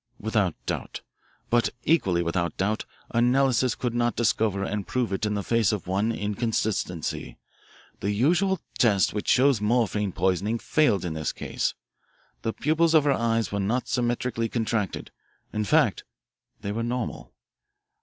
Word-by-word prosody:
Without 105 -6 0
doubt. - - -4 0.5
But 120 0 +3
equally 95 - +2
without 85 -1 -1
doubt 105 +3 -1 0.3
analysis 125 0 +3
could 120 +1 -2
not 120 0 +1
discover 105 -4 +1
and 100 0 -3
prove 125 -5 -1
it 100 +2 -1
in 105 - -1
the 100 - -2
face 115 -2 +2
of 105 -4 -3
one 100 +5 0
inconsistency. 105 -5 -2 0.6
The 100 - -2
usual 175 - +2 0.2
test 105 -5 +3
which 105 - -4
shows 130 -3 +4
morphine 105 -2 +1
poisoning 95 +5 0
failed 115 - +2
in 85 - -2
this 80 -1 -2
case. - - -2 0.7
The 115 - -1
pupils 160 +5 +2
of 155 - +6
her 145 - +3
eyes 115 -3 0
were 100 - -1
not 110 +6 0
symmetrically 120 -1 -1
contracted. 110 -4 -2 0.4
In 105 0 -1
fact - - +3 0.6
they 100 - -3
were 115 +3 -2
normal. 120 +2 -3
110 Hz, 145 wpm, -26 LUFS, 100-120 Hz, 0.7 s, of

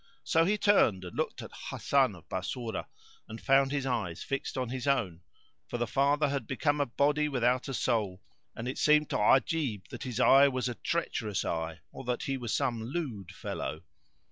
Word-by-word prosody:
So 165 0 +3
he 210 +4 +2
turned 120 - +3
and 90 - -8
looked - - -2
at - - -9 0.2
Hasan - - +2
of - - -16
Bassorah 120 -3 -4 0.4
and 110 +1 -8
found 135 +1 +3
his 140 -2 -1
eyes 110 -10 -2
fixed 135 0 -3
on 130 -2 -1
his 130 +1 -4
own, 95 -12 +1 0.5
for - - -3
the 120 - 0
father 140 +3 +2
had 135 -5 -2
become 145 +2 0
a 145 - +1
body 145 +5 +1
without 125 -1 +1
a 135 - -4
soul; 105 -8 -1 0.3
and 115 - -5
it 130 - -4
seemed 150 0 +4
to - - +1
Ajib 125 - +2
that - - -8
his 125 -2 -4
eye 135 +2 +7
was 130 -2 -1
a 125 - -2
treacherous 115 - -2
eye 80 -1 -3
or - - -9
that 125 0 -1
he 135 - -1
was 120 -4 -4
some 125 -5 0
lewd 115 - -4
fellow. - - -5
130 Hz, 195 wpm, -30 LUFS, 110-140 Hz, 0.5 s, eye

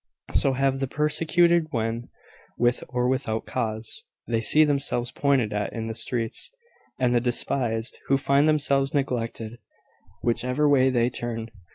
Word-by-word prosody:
So 135 - +3
have 135 0 +1
the 135 - -1
persecuted, 165 +3 +2
when, 115 -1 -3 0.5
with 120 0 +1
or 125 0 0
without 125 -4 -1
cause, 110 0 -3 0.2
they 115 -1 0
see 155 +7 +6
themselves 140 -5 0
pointed 135 -7 +1
at 105 -1 -2
in 115 -2 -4
the 115 - -4
streets; 115 0 -3 0.5
and 125 -1 +2
the 120 - +3
despised, 120 -1 -1
who 135 - +3
find 140 +2 +3
themselves 140 -2 +1
neglected, 120 -4 -2 0.6
whichever 125 +5 +1
way 130 -2 +4
they 120 -1 +1
turn. 115 -2 -5
125 Hz, 145 wpm, -25 LUFS, 115-140 Hz, 0.6 s, see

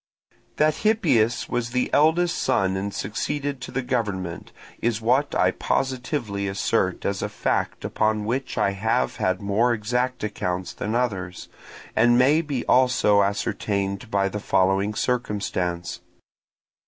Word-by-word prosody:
That 155 0 +2
Hippias 160 - +2
was 120 -1 -2
the 125 +1 -1
eldest 170 +3 +3
son 95 -1 +1
and 100 +1 -2
succeeded 140 +8 -3
to - - -7
the 135 0 -2
government, 100 -9 -3 0.3
is 115 -1 0
what 125 +6 +1
I - - +3
positively 125 -6 -2
assert 95 +1 0
as - - -1
a - - -2
fact - - -2
upon 110 -1 0
which 130 +4 -2
I 100 - +2
have 110 +5 0
had 95 +1 0
more 110 +5 +2
exact 125 +3 -1
accounts 90 -3 -3
than 110 +2 -3
others, 95 -8 -2 0.5
and 120 +2 +5
may 140 +6 +4
be 145 -6 -3
also 125 -5 +4
ascertained 100 +1 -1
by 100 -2 +1
the 105 +2 -4
following 95 +1 +1
circumstance. 100 -8 -2
110 Hz, 135 wpm, -24 LUFS, 100-125 Hz, 0.5 s, and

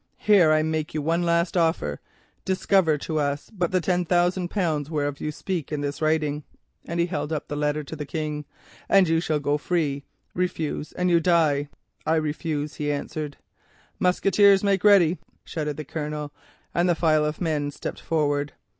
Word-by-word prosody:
Here 195 -7 +5
I 155 0 +3
make 160 -1 -2
you 155 - 0
one 165 +3 +1
last 170 +1 +1
offer. 160 - +1 0.4
Discover 190 -3 +2
but 145 - -3
to 155 -2 -1
us 145 0 -2
the 180 0 +1
ten 180 +1 +1
thousand 175 +1 +1
pounds 155 -8 -1
whereof 145 -3 -2
you 150 - -2
speak 170 0 -4
in 150 -1 -2
this 145 +1 -4
writing,' 155 -1 +1 0.4
and 170 +1 -3
he 170 - +3
held 170 -3 -3
up 155 -2 -3
the 145 - -4
letter 150 +1 0
to 145 - -7
the 150 -2 -6
King, 150 -1 -3 0.4
'and 195 -2 +5
you 165 0 +2
shall 155 -3 0
go 145 +1 0
free—refuse 155 +1 -3
and 180 0 0
you 170 - +5
die.' 155 -4 +2 0.4
"'I 160 - +3
refuse,' 155 -1 -2
he 145 -1 -1
answered. 145 0 -4 0.6
"'Musqueteers, 195 +2 +4
make 195 -2 +2
ready,' 185 -5 +5 0.3
shouted 150 -3 -3
the 155 - -5
Colonel, 150 0 -5 0.4
and 175 +1 +2
the 175 - +3
file 155 -2 +3
of 150 0 -2
men 155 -4 -1
stepped 145 - -6
forward. 145 -2 0
155 Hz, 175 wpm, -25 LUFS, 150-175 Hz, 0.6 s, Here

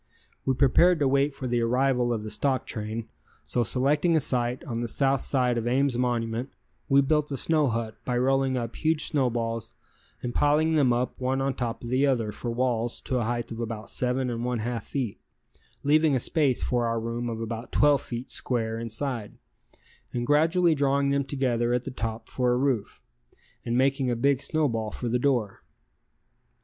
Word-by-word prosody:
We 130 - +2
prepared 155 +7 +4
to 145 -3 +2
wait 140 +1 +2
for 130 - -6
the 120 -1 0
arrival 125 +1 +2
of 110 -3 -2
the 110 - -5
stock 135 -3 0
train, 110 +1 -4 0.4
so 120 - -1
selecting 145 - +2
a - - +5
site 125 -3 -1
on 120 -7 -4
the 120 - -2
south 135 +3 +1
side 125 -3 +1
of 115 - -4
Ames 135 +1 +2
monument, 120 0 -1 0.4
we 140 0 +6
built 150 +1 +1
a 135 - -2
snow 155 +1 +2
hut 115 -2 -2
by 125 -1 -1
rolling 135 +1 +2
up 115 -1 -4
huge 160 -1 +1
snowballs 115 -5 -1 0.5
and 120 -1 -3
piling 150 +2 +3
them 140 -5 +4
up 125 +2 -1
one 130 +1 0
on 135 0 0
top 120 -2 -4
of 120 - -5
the 135 +3 +3
other 115 -6 0
for 120 - -5
walls 120 -1 -1
to 130 - -1
a 120 - -1
height 120 0 -3
of 115 - -6
about 115 -2 -4
seven 125 0 0
and 115 0 -3
one 125 0 -1
half 115 -1 -4
feet, 130 -7 -3 0.6
leaving 150 0 +4
a - - +2
space 140 -1 +2
for 120 -1 0
our 115 0 0
room 115 +1 -3
of 115 -1 -4
about 115 +1 -5
twelve 145 -1 +4
feet 120 +1 -6
square 115 -2 -1
inside, 115 0 -3 0.8
and 120 -1 -2
gradually 165 +5 +3
drawing 140 -1 +1
them 140 0 +1
together 125 -3 0
at 125 - -1
the 135 - -6
top 115 -2 -4
for 125 -1 0
a - - +1
roof, 130 -5 -1 0.6
and 120 0 -1
making 135 0 +2
a 120 - +1
big 135 +3 +2
snowball 120 -10 0
for 120 - -5
the 120 +1 +1
door. 120 -7 0
125 Hz, 190 wpm, -26 LUFS, 115-140 Hz, 0.8 s, we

